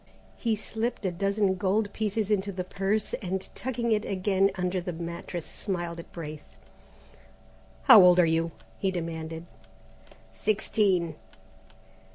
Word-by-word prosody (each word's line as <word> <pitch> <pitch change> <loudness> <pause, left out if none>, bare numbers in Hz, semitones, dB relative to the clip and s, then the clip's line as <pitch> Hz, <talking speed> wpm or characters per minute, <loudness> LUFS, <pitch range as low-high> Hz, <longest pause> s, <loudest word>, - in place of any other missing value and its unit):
He 230 -2 0
slipped 220 +1 -3
a 185 - +1
dozen 200 +2 +1
gold 205 +2 +1
pieces 215 -1 -1
into 200 -1 +1
the 185 -1 -3
purse, 195 +3 -1
and 190 0 -3
tucking 240 -2 -2
it 210 -1 +2
again 195 0 +2
under 180 0 -1
the 180 - -4
mattress 170 0 -5
smiled 175 -4 -4
at 170 - -10
Braith. 155 -3 -7 1.4
"How 210 - +10
old 180 0 +7
are 175 - +7
you?" 165 +1 +1 0.3
he 195 - +1
demanded. 165 -2 -4 0.9
"Sixteen." 190 - +1
190 Hz, 130 wpm, -28 LUFS, 170-210 Hz, 1.4 s, How